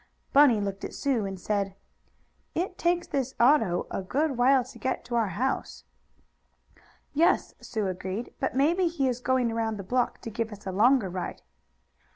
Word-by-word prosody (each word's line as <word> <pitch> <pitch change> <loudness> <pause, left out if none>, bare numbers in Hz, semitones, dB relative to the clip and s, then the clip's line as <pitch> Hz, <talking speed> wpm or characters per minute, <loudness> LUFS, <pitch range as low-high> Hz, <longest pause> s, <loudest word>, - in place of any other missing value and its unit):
Bunny 275 -6 +6
looked 200 -1 -4
at - - -5
Sue 250 -8 0
and 190 -1 -6
said: 200 0 -1 0.8
"It 365 +2 -2
takes 345 0 +1
this 265 -1 -2
auto 235 -9 +4
a - - -2
good 275 +9 0
while 255 +2 +4
to 255 - -13
get 260 - -2
to 240 - -7
our 230 -2 +2
house." 235 +9 -2 1.3
"Yes," 325 +4 +2
Sue 220 -3 -3
agreed, 190 +4 -4
"but 265 - -1
maybe 335 +7 +3
he 330 -5 0
is 250 -1 -1
going 250 -2 +1
around 225 -1 -1
the 195 - -6
block 245 +6 0
to 225 - -6
give 225 +1 -3
us 210 -1 -11
a 190 - -3
longer 230 +3 +4
ride." 180 0 -5
240 Hz, 175 wpm, -27 LUFS, 200-275 Hz, 1.3 s, Bunny